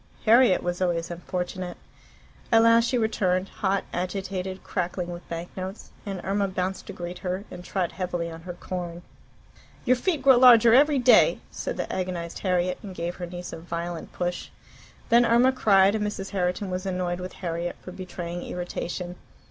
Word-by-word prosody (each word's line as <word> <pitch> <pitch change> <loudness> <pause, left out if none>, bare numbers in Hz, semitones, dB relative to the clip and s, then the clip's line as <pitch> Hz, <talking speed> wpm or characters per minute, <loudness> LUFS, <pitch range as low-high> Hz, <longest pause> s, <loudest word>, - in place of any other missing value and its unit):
Harriet 230 -2 +5
was 175 +1 -2
always 175 -2 0
unfortunate. 180 +1 -4 0.7
At 225 -1 +6
last 230 0 +6
she 255 - +1
returned, 195 -5 +1
hot, 195 -1 -1
agitated, 185 +1 -3
crackling 180 -1 -3
with 175 0 -9
bank 170 +1 -6
notes, 190 +2 -7 0.2
and 195 -2 -3
Irma 200 +1 0
bounced 185 0 -3
to - - -6
greet 175 0 -6
her, 185 +1 -3
and 180 - -8
trod 180 -1 -2
heavily 180 -2 -3
on 165 0 -9
her 180 +1 -7
corn. 175 -1 -6 0.8
"Your 255 0 +5
feet 305 +1 -1
grow 265 -2 +7
larger 235 -3 +8
every 290 +3 +5
day," 255 - +6
said - - -4
the - - -3
agonized 180 -2 -3
Harriet, 180 -1 0
and 195 -3 -8
gave 170 0 -3
her 175 - -5
niece 175 0 -7
a 165 - -6
violent 170 0 -5
push. 175 0 -3 0.6
Then 235 +1 +6
Irma 240 +2 +5
cried, 200 -6 +4
and 215 -1 -1
Mrs. 200 -2 -4
Herriton 185 0 -1
was 185 +1 -3
annoyed 180 -1 -2
with 180 0 -6
Harriet 170 -1 -3
for 185 - -8
betraying 175 -2 -6
irritation. 180 0 -5
185 Hz, 170 wpm, -26 LUFS, 175-205 Hz, 0.8 s, larger